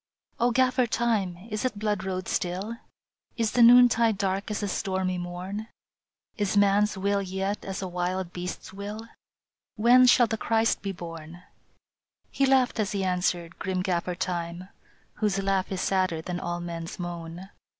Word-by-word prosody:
O 240 +1 +3
Gaffer 255 0 +2
Time, 220 -7 0
is 215 0 -2
it 255 -5 -1
blood 210 -2 -1
road 185 -1 -3
still? 190 +6 -2 0.6
Is 225 -2 +1
the 245 - +2
noontide 235 -2 +7
dark 195 0 -1
as 210 - -2
the 205 - -1
stormy 185 -1 -1
morn? 180 +5 -5 0.7
Is 205 -1 0
man 200 0 +5
s 210 - -5
will 200 +1 +1
yet 195 +2 -3
as 195 0 -5
a - - -3
wild 180 0 -3
beast 180 0 -5
s - - -12
will? 205 +3 -6 0.7
When 245 +3 +6
shall 245 0 +6
the 225 0 -2
Christ 225 +1 +1
be 195 - -3
born? 170 -1 -9 0.4
" - - -48
He 275 - +2
laughed 260 -3 +3
as 210 -1 0
he 195 -1 -1
answered, 180 -2 -1
grim 185 -1 -2
Gaffer 180 -1 -1
Time, 175 0 -4 0.5
Whose 210 -2 0
laugh 195 -1 0
is 190 -1 -2
sadder 185 -4 +1
than 180 +1 -4
all 175 0 -3
men 170 -1 -5
s - - -8
moan. 175 +1 -6
195 Hz, 170 wpm, -27 LUFS, 180-215 Hz, 0.7 s, noontide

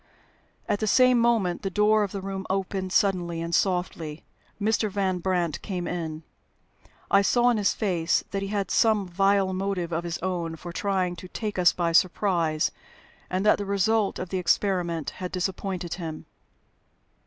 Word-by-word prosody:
At 205 - 0
the 215 - -1
same 255 +2 +5
moment 225 -7 +2
the 195 - -2
door 210 +2 +3
of 200 -2 -1
the 200 - -5
room 195 -1 -5
opened 190 0 -2
suddenly 180 -4 +1
and 170 +1 -4
softly. 170 -4 -1 0.4
Mr. 215 +1 +1
Van 190 -2 -1
Brandt 175 -3 -1
came 180 -4 -4
in. 160 -2 -4 0.9
I 200 - +6
saw 240 +4 +3
in 235 - +1
his 205 -2 +1
face 175 -5 +1
that 195 - -2
he 195 - -3
had 200 -2 -2
some 215 -4 +3
vile 195 +1 +2
motive 185 -2 -2
of 165 +1 -1
his 170 -1 -3
own 175 -3 -2
for 170 +1 -9
trying 190 -2 -1
to 185 - -9
take 210 +1 -4
us 175 -3 +6
by 170 -1 -1
surprise, 170 -3 +2 0.6
and 185 +2 -1
that 210 - +5
the 205 - -3
result 200 +1 +1
of 185 - -5
the 185 - -1
experiment 170 -6 0
had 180 - -4
disappointed 185 -1 -3
him. 160 -3 -6
185 Hz, 170 wpm, -26 LUFS, 175-200 Hz, 0.9 s, I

